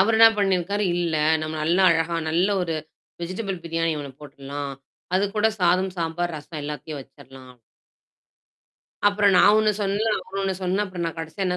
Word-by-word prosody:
அவரு 220 +3 +4
என்ன 225 - +10
பண்ணியிருக்காரு 200 +1 +1
இல்ல. 170 -2 -1 0.3
நம்ம 155 0 -4
நல்லா 175 +4 +3
அழகா, 165 +1 +1
நல்ல 175 +5 +2
ஒரு 165 -2 -2 0.5
வெஜிடபிள் 185 0 -4
பிரியாணி 165 0 0
ஒண்ணு 140 -2 -8
போட்டுடலாம். 140 0 -7 0.4
அது 195 +2 +3
கூட 215 +1 +4
சாதம், 180 +2 +2
சாம்பார், 170 +1 -2
ரசம் 150 +1 -8
எல்லாத்தையும் 150 0 -6
வச்சரலாம். 130 -1 -14 1.5
அப்புறம் 205 -1 +3
நான் 205 +4 +6
ஒண்ணு 215 0 +3
சொன்னல. 205 +3 0
அவரு 195 +1 -5
ஒண்ணு 190 -1 0
சொன்னேன் 185 +3 +1
அப்புறம் 180 -3 -5
நான் 165 - -5
கடைசியா 165 +5 -4
என்ன 180 0 0
175 Hz, 160 wpm, -24 LUFS, 155-195 Hz, 1.5 s, என்ன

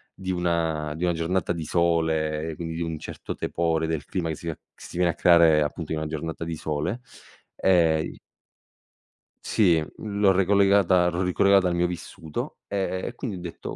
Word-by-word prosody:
di 95 - -7
una 85 -4 -1
di 85 +3 -2
una 90 - +2
giornata 85 +2 -1
di 85 -2 -5
sole 80 -2 +1
e - - -7
quindi 80 +1 -5
di 85 - -4
un 80 -2 -3
certo - - -6
tepore, 80 -1 -1
del 80 -3 -2
clima 85 -4 -3
che 80 - -2
si 85 - -12
va 80 - -1
che - - -39 0.3
si - - -9
viene 90 -1 +3
a - - -11
creare 85 -3 +5
appunto 75 +2 -5
in - - -1
una 80 - -3
giornata 80 +1 -4
di 85 0 -3
sole; 80 +9 -3 0.5
e 85 -4 +3
i - - -17 1.2
Sì, 85 -7 +3
l'ho 100 -2 +2
ricollegata 95 -2 +4
l'ho 90 +2 -1
ricollegata 95 +1 +4
al 90 - 0
mio 85 0 +1
vissuto, 80 -3 -6
e 100 - -3 0.2
ehm, - - -5
e 120 - -5
quindi 115 -6 -5
ho - - -8
detto: 85 -1 -7
85 Hz, 195 wpm, -25 LUFS, 80-90 Hz, 1.2 s, creare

